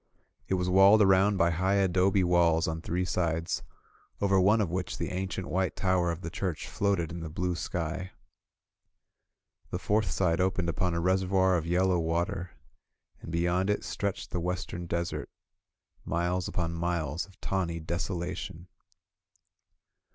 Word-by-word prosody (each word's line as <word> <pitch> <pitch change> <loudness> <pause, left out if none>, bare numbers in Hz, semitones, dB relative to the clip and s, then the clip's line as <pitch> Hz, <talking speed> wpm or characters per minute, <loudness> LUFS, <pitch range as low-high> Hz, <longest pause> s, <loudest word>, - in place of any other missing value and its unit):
It 95 - +1
was 90 0 -1
walled 95 +3 +7
around 95 +1 +4
by 85 -2 +3
high 95 +4 +1
adobe 95 0 +3
walls 85 -2 +3
on 80 0 -3
three 90 +3 -1
sides, 85 -2 -1 0.6
over 100 -1 +3
one 105 +4 +4
of 100 -6 0
which 90 0 -3
the - - -3
ancient 95 0 -3
white 95 +3 0
tower 90 -2 +1
of 85 +1 -5
the 85 - -5
church 90 -4 -3
floated 100 -6 0
in 85 - -5
the 80 -1 -5
blue 90 +3 -1
sky. 85 +2 -3 1.6
The - - -2
fourth 105 -2 +1
side 85 0 +1
opened 95 -2 0
upon 85 +1 0
a - - 0
reservoir 95 +1 +2
of 85 -1 -1
yellow 90 +1 +2
water, 85 +2 -1 0.7
and - - -8
be 85 0 0
yond 90 +3 +1
it 105 - 0
stretched 100 -2 -3
the 90 - -1
western 90 0 -3
desert, 85 +1 -3 0.7
miles 90 +2 -1
upon 85 -2 -2
miles 85 -1 -2
of 95 - -21
tawny 85 -4 -2
desolation. 85 +1 -4
90 Hz, 150 wpm, -29 LUFS, 85-95 Hz, 1.6 s, walled